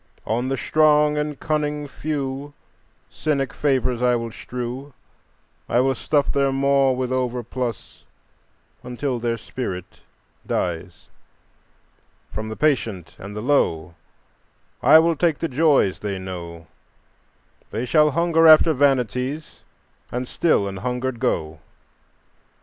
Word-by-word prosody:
"On 120 +4 -1
the 135 0 -1
strong 150 0 +3
and 150 -1 -3
cunning 150 -1 -2
few 140 -1 -4 0.5
Cynic 140 -3 -2
favors 130 -4 0
I 125 -1 +3
will 115 -1 -3
strew; 125 +4 -6 0.7
I 120 - +3
will 135 +1 +3
stuff 145 +2 0
their 140 -1 +1
maw 135 0 +3
with 130 0 -3
overplus 125 -2 -3 0.8
until 125 +1 -3
their 115 0 -1
spirit 100 -6 -6 0.5
dies; 85 -1 -3 1.2
From 110 0 -5
the 110 - -5
patient 115 - -1
and 100 +1 -8
the 105 - -4
low 90 - +1 0.9
I - - +8
will 165 +1 +3
take 160 -1 +1
the 165 - -2
joys 140 - +2
they 100 -2 -3
know; 85 -3 -7 1.0
They 115 +3 -3
shall 150 +4 +4
hunger 165 +2 +3
after 160 +1 +7
vanities 135 +1 0 0.5
and 125 +1 -3
still 140 -12 +1
an 95 -1 -5
hungered 125 +3 -3
go. 80 -5 -1
130 Hz, 120 wpm, -22 LUFS, 115-145 Hz, 1.2 s, I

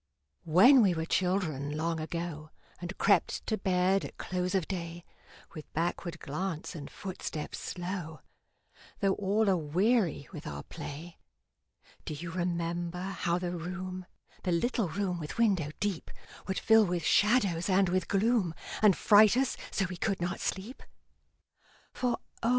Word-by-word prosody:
When 205 - +7
we 190 -5 +3
were 160 0 -2
children, 165 -6 0
long 165 +1 -1
ago, 160 -1 -4 0.3
And 175 +2 -6
crept 200 - +2
to 220 - 0
bed 190 -1 +2
at - - -8
close 180 0 -2
of 185 -5 +1
day, 170 -2 -5 0.5
With 155 - -10
backward 170 0 -2
glance 165 +3 -4
and 150 -5 -7
footstep 185 -5 -6
slow, 175 -3 -5 0.8
Though 195 -1 +3
all 205 +3 +1
aweary 185 - +2
with 160 -2 -8
our - - -5
play, 165 +1 -8 0.8
Do 155 - -5
you 165 +3 -6
remember 175 0 -2
how 180 -3 -1
the 180 -1 -3
room 185 +1 -5 0.3
The 185 - -1
little 205 +3 +1
room 180 +1 -2
with 150 +5 -6
window 195 -10 +2
deep 200 -5 -2 0.4
Would 190 - -1
fill 225 0 +5
with 175 -2 -1
shadows 200 -2 +3
and 190 0 +4
with 185 0 0
gloom, 200 -4 +2 0.3
And 210 -4 +6
fright 215 +2 +6
us 265 0 +1
so 195 - 0
we 180 -1 -6
could 195 +2 -1
not 175 +1 -2
sleep? 210 +8 -4 1.1
For 250 -2 0 0.2
O! 230 - +1
180 Hz, 145 wpm, -30 LUFS, 165-195 Hz, 1.1 s, When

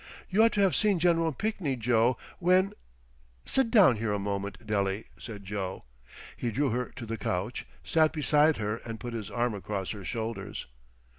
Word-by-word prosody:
You 200 +4 +4
ought 230 0 +5
to 205 - +2
have 195 -3 +4
seen 210 -3 +3
Gen. 165 -1 +3
Pinkney, 195 -7 -1
Joe, 120 +1 +2 0.2
when—" 185 +2 +3 0.7
"Sit 265 -3 +1
down 195 - +6
here 110 0 -1
a 105 - +1
moment, 100 -1 -4
Dele," 100 -1 0 0.2
said 105 -4 -8
Joe. 95 -6 -4 0.5
He 120 - -2
drew 135 +4 +1
her 125 +2 0
to 125 -3 -6
the 115 0 -4
couch, 100 +4 -2 0.2
sat 160 -1 +3
beside 150 0 +3
her 105 0 -2
and 115 -1 -7
put 120 -1 -6
his 110 -3 -4
arm 120 -1 0
across 100 -1 -3
her 105 -2 -7
shoulders. 115 +2 -4
120 Hz, 175 wpm, -29 LUFS, 105-160 Hz, 0.7 s, down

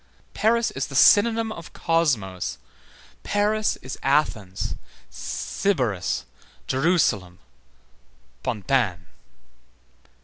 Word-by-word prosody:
Paris 230 +2 +2
is 135 - -3
the 135 - -9
synonym 225 - +5
of 170 -5 -9
Cosmos, 125 - 0 0.6
Paris 210 +1 +1
is 130 +1 -6
Athens, 110 -10 0 0.4
Sybaris, 125 - -1 0.4
Jerusalem, 130 - +1 1.0
Pantin. 100 - 0
135 Hz, 70 wpm, -24 LUFS, -, 1.0 s, synonym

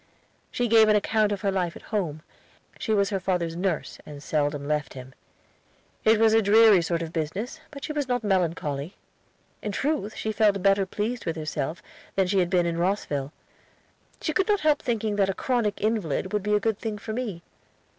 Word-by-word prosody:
She 245 - -1
gave 220 -1 +6
an 215 - +5
account 210 0 +2
of 200 -2 -2
her 200 - +1
life 180 -3 -1
at - - -11
home. 160 -7 -2 0.6
She 220 - -2
was 200 -1 +2
her 195 - 0
father's 180 -3 -1
nurse, 180 -2 -2
and 145 -1 -10
seldom 145 -2 -1
left 150 -2 -2
him. 130 0 -10 0.9
It 220 0 +4
was 220 -1 +5
a 225 - +5
dreary 215 -2 +6
sort 170 0 -1
of 165 0 -7
business, 190 - -3
but 280 -1 -10
she 305 - -3
was 290 -3 -1
not 245 -2 -1
melancholy. 170 -5 -1 0.7
In 210 - -3
truth, 270 -2 -1
she 220 - -2
felt 205 -3 +2
better 195 -1 +3
pleased 220 +3 -3
with 165 - -1
herself 155 +1 -4 0.3
than 195 - +3
she 190 +1 +1
had 175 -1 +1
been 180 -2 +2
in 170 0 -1
Rosville. 150 -7 -1 0.9
She 310 - -2
could 375 - +1
not 410 -2 +2
help 300 -1 +3
thinking 220 -3 -1
that 195 -1 +3
a 195 - -1
chronic 235 -6 0
invalid 200 -4 -1
would 210 - +1
be 210 +2 +1
a - - +3
good 215 0 -1
thing 220 -2 -4
for 215 +2 -6
me. 215 -8 -4
200 Hz, 200 wpm, -26 LUFS, 170-220 Hz, 0.9 s, gave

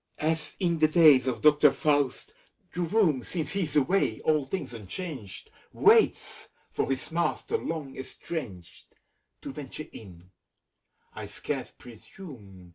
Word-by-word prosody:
As 160 0 -1
in 170 -4 0
the 155 - +5
days 155 -5 +6
of 120 -3 -2
Doctor 150 0 +6
Faust, 145 - 0 0.4
the 180 - -3
room. 170 - +2
Since 160 +4 -3
he's 190 -6 -2
away, 150 +7 +2
all 155 -3 +1
things 135 -3 -5
unchanged, 115 - -7 0.2
Waits - - +3 0.2
for - - -1
its 135 +4 -3
master 170 - -1
long 160 - -4
estranged. 130 - -8 0.5
To - - -5
venture 150 +1 -7
in, 90 -3 -13 0.8
I - - -7
scarce - - -5
presume. 110 - -13
150 Hz, 125 wpm, -28 LUFS, 125-165 Hz, 0.8 s, days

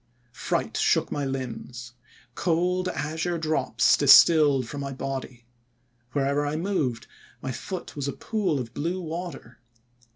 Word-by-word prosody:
* 120 0 -39
Fright - - -2
shook - - +2
my 145 - -2
limbs. 125 -2 -6 0.4
Cold 180 +3 0
azure 160 +2 -2
drops 160 -1 +2
distilled 145 -6 +6
from 145 +3 -6
my 140 0 -4
body. 130 -2 -6 0.7
Wherever 140 +1 +1
I 145 +1 -2
moved 155 - -1 0.3
my 130 - -4
foot 180 +8 -6
was 140 -1 -3
a 140 - -2
pool 205 -10 -1
of 120 -2 -6
blue 170 +5 -2
water. 165 -8 -7
145 Hz, 135 wpm, -26 LUFS, 130-170 Hz, 0.7 s, distilled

